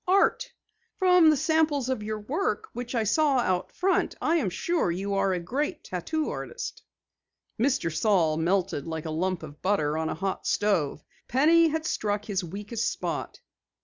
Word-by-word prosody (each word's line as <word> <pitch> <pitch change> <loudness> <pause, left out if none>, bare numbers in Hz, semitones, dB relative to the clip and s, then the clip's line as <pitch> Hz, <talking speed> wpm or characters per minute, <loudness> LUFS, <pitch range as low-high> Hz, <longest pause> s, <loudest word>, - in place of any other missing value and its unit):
"Art. 395 +6 +3 0.5
From 360 -4 +6
the 305 - +4
samples 310 -3 +2
of 260 -4 -1
your 215 +1 -3
work 390 - -2
which 245 +1 -5
I 230 - +2
saw 280 +6 +3
out 185 -6 0
front 380 +1 +1
I 335 - +2
am 255 - 0
sure 340 - 0
you 195 +4 -2
are 195 0 +2
a 180 - 0
great 285 - -3
tattoo 305 - -2
artist." 480 - -6 0.8
Mr. 235 - +1
Saal 170 -5 +3
melted 175 -2 0
like 160 -1 -4
a 160 - -3
lump 175 +2 -1
of 150 -1 -10
butter 160 -6 +1
on 160 0 -1
a - - -2
hot 195 -1 -3
stove. 165 -9 +1 0.2
Penny 325 +6 +5
had 315 0 -2
struck 210 -6 -1
his 195 -3 -2
weakest 210 +6 -3
spot. - - -4
210 Hz, 170 wpm, -27 LUFS, -, 0.8 s, From